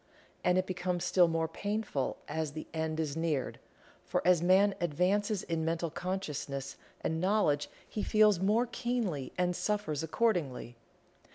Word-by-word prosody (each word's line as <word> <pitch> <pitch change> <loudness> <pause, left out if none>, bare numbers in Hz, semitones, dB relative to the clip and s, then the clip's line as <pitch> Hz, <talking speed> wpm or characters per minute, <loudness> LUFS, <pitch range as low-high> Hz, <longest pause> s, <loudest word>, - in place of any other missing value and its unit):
And 180 0 +3
it 185 - +2
becomes 180 -1 -2
still 180 -2 +5
more 165 -1 0
painful 205 -5 -2
as 160 -2 -2
the 155 - -6
end 160 0 -2
is 155 -3 -1
neared, 160 -5 -1 0.4
for - - -2
as 180 -2 +5
man 190 +3 +5
advances 185 +5 +1
in 165 -1 -2
mental 165 0 -1
consciousness 150 -7 -4 0.3
and 160 +1 -1
knowledge 185 -7 +2 0.2
he 215 - -4
feels 215 -4 +4
more 210 +6 +3
keenly 230 - -2
and 180 0 +1
suffers 205 -10 -1
accordingly. 160 - 0
175 Hz, 145 wpm, -31 LUFS, 160-200 Hz, 0.4 s, still